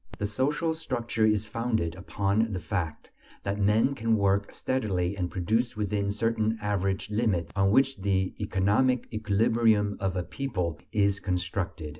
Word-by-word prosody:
The 105 - -2
social 145 +10 0
structure 120 -8 -1
is 105 -1 +2
founded 110 -6 -1
upon 100 +3 0
the 90 - -2
fact 80 -2 -4 0.3
that 100 +1 -2
men 105 +6 +3
can 115 -4 +1
work 100 0 +1
steadily 100 -8 -1
and 90 -3 -2
produce 110 +7 0
within 105 -1 -1
certain 110 +1 0
average 100 -1 -1
limits 105 -6 0
on 95 0 +3
which 135 +4 +3
the 95 -1 +1
economic 105 +6 +2
equilibrium 110 0 +2
of 95 -1 -1
a 90 - -1
people 90 - -3
is 100 -2 +2
constructed. 90 -4 -3
105 Hz, 145 wpm, -28 LUFS, 95-115 Hz, 0.3 s, men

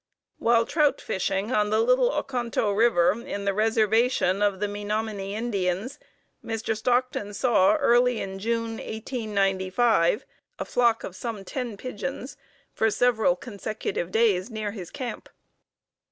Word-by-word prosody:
While 230 0 +3
trout 295 +2 +2
fishing 195 +4 -2
on 210 -4 +2
the 215 +1 +2
Little 250 +2 +3
Oconto 245 -7 -1
River 190 -6 +4
in 200 -3 -5
the 200 - +1
Reservation 220 -1 +2
of 200 -2 +1
the 210 - 0
Menominee 205 -1 -3
Indians, 205 0 -2 0.4
Mr. 225 0 -2
Stockton 240 -3 0
saw, 225 -1 +4
early 245 -4 +3
in 195 0 -5
June, 230 +1 -2
1895, 210 -3 0 0.3
a - - -4
flock 235 -2 +2
of 185 - -7
some 215 -2 -5
ten 240 -1 -4
pigeons 255 +4 -6 0.4
for 220 - +2
several 220 -5 +2
consecutive 205 -4 -4
days 215 -2 +2
near 215 -2 -4
his 190 -5 -8
camp. 250 -2 -6
220 Hz, 130 wpm, -26 LUFS, 200-240 Hz, 0.4 s, River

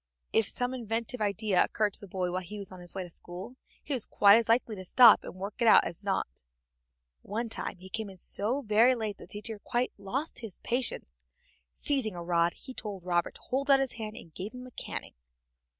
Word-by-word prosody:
If 225 -2 +4
some 250 +1 -1
inventive 230 0 -3
idea 205 -2 +2
occurred 210 -2 0
to - - 0
the 200 - -9
boy 180 -1 -2
while 185 +1 -2
he 205 +4 -8
was 200 -2 -6
on 185 - -10
his 175 +1 -7
way 190 - -2
to 175 - -10
school, 180 +9 -6 0.3
he 290 - -3
was 250 -5 0
quite 200 0 +6
as 230 0 +2
likely 230 -1 +2
to 185 - -7
stop 230 +4 +7
and - - -8
work 195 +2 -5
it 235 - +4
out - - +8
as 175 +4 -6
not. 190 - -2 0.8
One 225 +3 -3
time 210 - -2
he 185 +1 -12
came 220 +1 -4
in 190 - -12
so 230 +9 +2
very 230 +3 +5
late 215 -3 -4
that - - -10
the - - -9
teacher 210 +1 -5
quite 240 +4 -1
lost 255 +11 -2
his 225 -6 -7
patience. 230 - -2 0.5
Seizing 260 -9 0
a 175 - -6
rod 170 0 +2
he 260 - -9
told 205 -7 -6
Robert 175 -1 0
to - - -14
hold 275 +2 -2
out 275 -1 +7
his 270 -2 0
hand, 220 -2 -6
and 165 - -11
gave 200 +9 -6
him 250 0 -8
a 255 - -12
caning. - - -5
210 Hz, 230 wpm, -30 LUFS, 185-240 Hz, 0.8 s, out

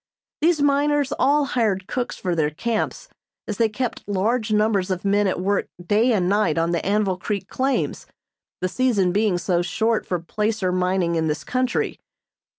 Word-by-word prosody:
These 315 -2 +3
miners 290 0 +2
all 285 +2 +3
hired 215 -8 0
cooks 245 +4 -3
for 180 - -2
their 155 -3 +1
camps, 230 - -3 0.4
as 210 - -3
they 225 -1 +3
kept 240 +2 -3
large 215 +3 0
numbers 210 -3 +2
of 185 0 -3
men 200 +1 +3
at 185 - -1
work 200 +2 0
day 210 +8 +2
and 190 -6 +2
night 205 -5 +2
on 165 +1 +1
the 170 - -1
Anvil 200 -1 +1
Creek 200 0 -3
claims, 265 +5 -1 0.5
the 185 - +1
season 205 -4 +1
being 205 -1 +2
so 175 0 0
short 220 +5 0
for 180 - 0
placer 210 +2 -1
mining 180 -1 +1
in 160 -1 0
this 150 0 -2
country. 255 +7 -1
205 Hz, 170 wpm, -23 LUFS, 180-235 Hz, 0.5 s, These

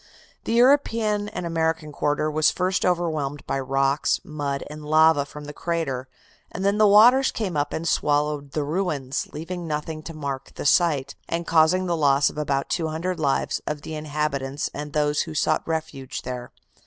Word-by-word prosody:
The - - -1
European 230 -5 +3
and 180 - -5
American 160 -2 -1
quarter 150 +1 0
was 155 0 +3
first 185 +1 0
overwhelmed 155 -5 -1
by 135 - -1
rocks, 135 +2 +1
mud 145 -2 -3
and 150 0 -9
lava 155 -1 +4
from 150 +1 -10
the 145 - -8
crater, 145 -7 -2 0.4
and 190 - -4
then 200 +1 +2
the 215 - +6
waters 240 +6 +6
came 195 -7 -3
up 145 0 0
and 165 +1 -3
swallowed 145 -2 0
the 150 - 0
ruins, 150 -4 -2
leaving 170 +2 -6
nothing 155 +1 -3
to 165 +1 -9
mark 140 -3 -5
the - - -6
site, 145 -4 +3 0.2
and 170 0 -2
causing 165 +3 +3
the 175 -1 0
loss 140 -2 +3
of - - -7
about 140 -2 -1
200 170 +2 -2
lives 140 -3 0
of 150 -1 -3
the 160 - -6
inhabitants 150 -2 -2
and 145 0 -6
those 150 -1 +1
who 160 -2 -5
sought 155 +1 +2
refuge 155 -5 -4
there." 125 -1 -6
155 Hz, 175 wpm, -24 LUFS, 145-170 Hz, 0.4 s, the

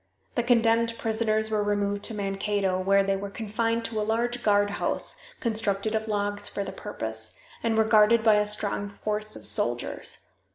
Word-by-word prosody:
The - - +1
condemned 230 -1 +2
prisoners 220 -1 0
were 215 -1 +1
removed 205 -1 0
to 225 - -4
Mankato, 195 -1 -1
where 195 +1 +3
they 195 0 0
were 200 +1 -5
confined 230 +2 -1
in 225 - -5
a - - 0
large 235 +3 -1
guardhouse, 205 -1 +1 0.2
constructed 215 -2 0
of 220 0 -1
logs 205 -1 0
for 200 - -3
the - - -5
purpose, 110 - -4 0.2
and 225 -1 0
were 220 - +5
guarded 220 +1 +5
by 220 -2 +5
a 210 0 +2
strong 205 -1 0
force 215 +1 -3
of - - -8
soldiers. - - 0
210 Hz, 170 wpm, -26 LUFS, 200-225 Hz, 0.2 s, were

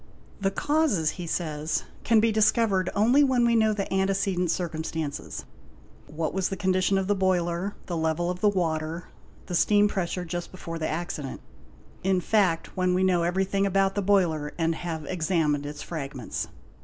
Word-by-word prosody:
''The 195 - +2
causes', 290 - +2
he 170 - -5
says, 155 -2 -2 0.2
'can 225 -1 +4
be 225 +1 +3
discovered 215 -3 +3
only 240 +8 +5
when 255 -3 +3
we 235 0 +3
know 220 -1 +4
the 205 -2 -1
antecedent 190 -2 +1
circumstances, 160 -3 -3 0.6
what 155 +1 -3
was 190 0 0
the 195 - -4
condition 185 0 +2
of 195 - 0
the 205 - +2
boiler, 185 0 0
the 175 - -4
level 160 +2 0
of 180 - -6
the 210 - +5
water, 165 -3 -2 0.4
the 180 - -6
steam 205 +4 +4
pressure 180 -3 -2
just 175 +1 -4
before 165 -3 -6
the 155 - -1
accident, 155 -4 -4 0.6
in 190 0 +2
fact 180 -3 +1
when 185 -1 +1
we 185 - +2
know 180 -2 +3
everything 190 +3 +1
about 195 0 +2
the 205 - -1
boiler 175 -7 +1
and 165 -1 +1
have 160 -2 -5
examined 160 -4 0
its 150 0 -7
fragments". 140 -7 -5
180 Hz, 165 wpm, -26 LUFS, 165-195 Hz, 0.6 s, only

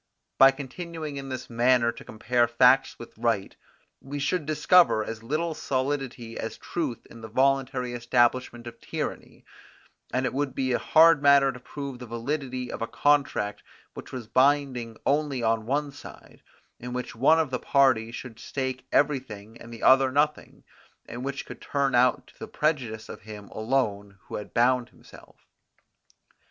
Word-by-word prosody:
By 135 - +9
continuing 150 +2 -6
in 135 0 -6
this 130 -1 -5
manner 120 0 +3
to 115 - -12
compare 120 +2 0
facts 125 +3 +4
with 120 - -12
right, 115 -4 -1 0.5
we 140 +2 -6
should 150 +3 -1
discover 155 -5 +4
as 110 0 -6
little 155 +8 -2
solidity 130 -5 -3
as 110 0 -5
truth 150 -9 -4
in 115 - -12
the 110 - -7
voluntary 130 0 0
establishment 120 0 +1
of 115 -1 -10
tyranny; - - -6 0.7
and 130 +1 0
it 125 - -2
would 135 -1 -2
be 130 -1 0
a - - +1
hard 165 -1 +5
matter 140 -1 +5
to 125 - -11
prove 140 0 -7
the 125 - -9
validity 125 +2 -4
of - - -7
a 115 - -1
contract 140 -8 +1 0.3
which - - -10
was 125 -3 -6
binding 130 -1 +1
only 140 -3 0
on 115 -1 0
one 145 +2 -1
side, 140 - -13 0.4
in 125 +1 -7
which 125 0 -5
one 140 +7 +4
of 160 -4 0
the 125 - -1
parties 125 -5 +2
should 115 -3 -9
stake 130 -1 -4
everything 115 -7 -1
and 115 - -11
the 115 - -9
other 130 0 +5
nothing, 150 +2 -1 0.4
and 120 +2 -7
which 140 0 -4
could - - -11
turn 140 -1 -1
out 125 +1 +3
to - - -22
the - - -7
prejudice 130 -8 -2
of - - -9
him 105 -2 -10
alone 110 -4 -2
who - - -8
had 105 - -8
bound 125 +1 +2
himself. - - -18
130 Hz, 165 wpm, -26 LUFS, 115-140 Hz, 0.7 s, By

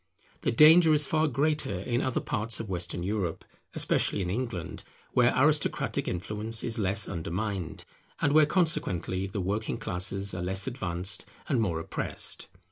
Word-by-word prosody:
The - - +1
danger 155 +5 +7
is 150 0 +3
far 155 +3 +2
greater 145 - 0
in 120 +5 -1
other 130 - -1
parts 110 +2 -2
of 115 - -5
Western 90 -2 -3
Europe; 95 -3 -2 0.3
especially 100 - +1
in 90 - -2
England, 115 -6 -4 0.3
where - - +4
aristocratic - - +2
influence 105 +5 -1
is 115 0 -1
less 100 0 +2
undermined, 95 +1 -4 0.3
and 145 - +2
where 155 -1 +6
consequently 95 - 0
the 95 +1 -4
working 105 +4 -2
classes 95 +1 -1
are 90 - -4
less 95 +2 0
advanced 95 -7 -3 0.2
and 130 -6 +1
more 85 -7 0
oppressed. 80 - -5
105 Hz, 150 wpm, -28 LUFS, 90-130 Hz, 0.3 s, danger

